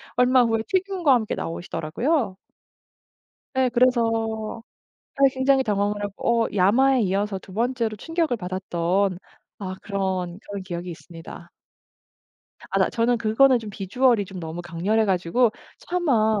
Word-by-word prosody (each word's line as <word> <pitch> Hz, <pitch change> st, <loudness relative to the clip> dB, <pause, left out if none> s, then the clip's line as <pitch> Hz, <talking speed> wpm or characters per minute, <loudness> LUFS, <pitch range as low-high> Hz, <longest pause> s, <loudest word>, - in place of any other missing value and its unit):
얼마 250 Hz, +1 st, +5 dB
후에 225 Hz, -1 st, +1 dB
튀김과 375 Hz, -6 st, +2 dB
함께 225 Hz, -4 st, 0 dB
나오시더라고요. 190 Hz, -, -2 dB, 1.2 s
예 260 Hz, -1 st, +2 dB
그래서 225 Hz, -3 st, +1 dB, 0.5 s
사실 275 Hz, -1 st, +4 dB
굉장히 265 Hz, 0 st, +3 dB
당황을 205 Hz, -2 st, -1 dB
하고 230 Hz, +3 st, 0 dB
어 -, -, -1 dB
야마에 240 Hz, +7 st, +4 dB
이어서 200 Hz, 0 st, -1 dB
2 190 Hz, -, -14 dB
번째로 230 Hz, 0 st, -1 dB
충격을 325 Hz, -, -1 dB
받았던 185 Hz, 0 st, -1 dB, 0.4 s
아 185 Hz, -2 st, -5 dB
그런, 190 Hz, -3 st, -3 dB
그런 200 Hz, -1 st, -6 dB
기억이 175 Hz, -1 st, -6 dB
있습니다. 165 Hz, +1 st, -11 dB, 1.2 s
아 -, -, +1 dB
나 -, -, +2 dB
저는 235 Hz, +1 st, +1 dB
그거는 235 Hz, +4 st, +4 dB
좀 220 Hz, -2 st, -8 dB
비주얼이 210 Hz, +3 st, +1 dB
좀 190 Hz, -1 st, -9 dB
너무 165 Hz, +1 st, -6 dB
강렬해 180 Hz, +7 st, 0 dB
가지고 195 Hz, +5 st, +2 dB, 0.3 s
차마 235 Hz, -, +1 dB
215 Hz, 295 characters per minute, -24 LUFS, 190-250 Hz, 1.2 s, 얼마